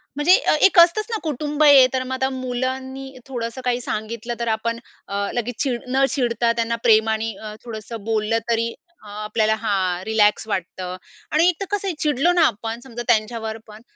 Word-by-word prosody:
म्हणजे 300 +6 +5
अ, - - +2
एक 385 - +3
असतंच 345 +6 +5
ना, 445 - -1
कुटुंब 300 0 -1
आहे. 285 -3 +8
तर 260 -1 0
मग 260 0 -5
आता 265 0 0
मुलांनी 260 +1 -4 0.2
थोडंसं 240 -1 -5
काही 250 0 0
सांगितलं, 230 +1 -4
तर 235 - -2
आपण 230 +1 -2 0.3
अ, 200 0 -2
लगेच 240 0 -3
चीड 250 -4 -2
न 270 +1 +4
चिडता 240 -3 +1
त्यांना 230 0 -1
प्रेमानी 220 0 +3
अ, 215 -1 -7
थोडंसं 225 -1 -7
बोललं, 220 0 0
तरी 230 0 0 0.3
अ, - - -13
आपल्याला 215 +1 0
हां, 195 -5 -1
रिलॅक्स 220 -1 +2
वाटतं. 185 -2 -4 0.4
आणि 320 +3 +4
एक 360 - 0
तर - - -1
कसं 405 -1 -1
आहे, 375 - -1
चिडलो 295 +3 +2
ना 350 - +3
आपण 225 -1 -2
समजा 240 -2 -7
त्यांच्यावर 220 -1 0
पण, 215 0 -13
235 Hz, 185 wpm, -22 LUFS, 220-265 Hz, 0.4 s, आहे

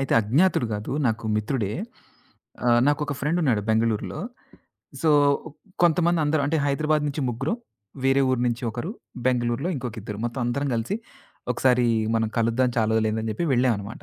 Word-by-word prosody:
అయితే 135 - -1
అజ్ఞాతుడు 125 - +2
కాదు. 105 +1 -5 0.2
నాకు 115 -1 -1
మిత్రుడే. 105 -1 -1 1.0
ఆహ్, 120 0 +5
నాకొక 145 -1 0
ఫ్రెండ్ 155 +5 0
ఉన్నాడు. 115 -9 +2
బెంగుళూరులో. 110 -1 0 0.8
సో, 160 - +4 0.7
కొంతమంది 170 0 +3
అందరు 150 0 +1
అంటే 160 - +1
హైదరాబాద్ 150 +2 +1
నుంచి 145 +1 -3
ముగ్గురు, 135 +6 -2 0.5
వేరే 135 +1 +4
ఊరు 130 -2 +1
నుంచి 120 0 -1
ఒకరు, 120 - -4 0.4
బెంగుళూరులో 125 +4 +1
ఇంకొక 125 -3 -5
ఇద్దరు, 105 0 -6
మొత్తం 120 +2 -3
అందరం 140 +4 -1
కలిసి 115 - -1 0.6
ఒకసారి 125 0 +3 0.3
మనం 110 -1 +1
కలుద్దాం 115 +2 +2
చాలా 110 -1 +2
రోజులయింది. 110 0 +1
అని 110 - -2
చెప్పి 170 - -1
వెళ్ళామన్నమాట. 115 -4 0
125 Hz, 150 wpm, -24 LUFS, 115-145 Hz, 1.0 s, ఆహ్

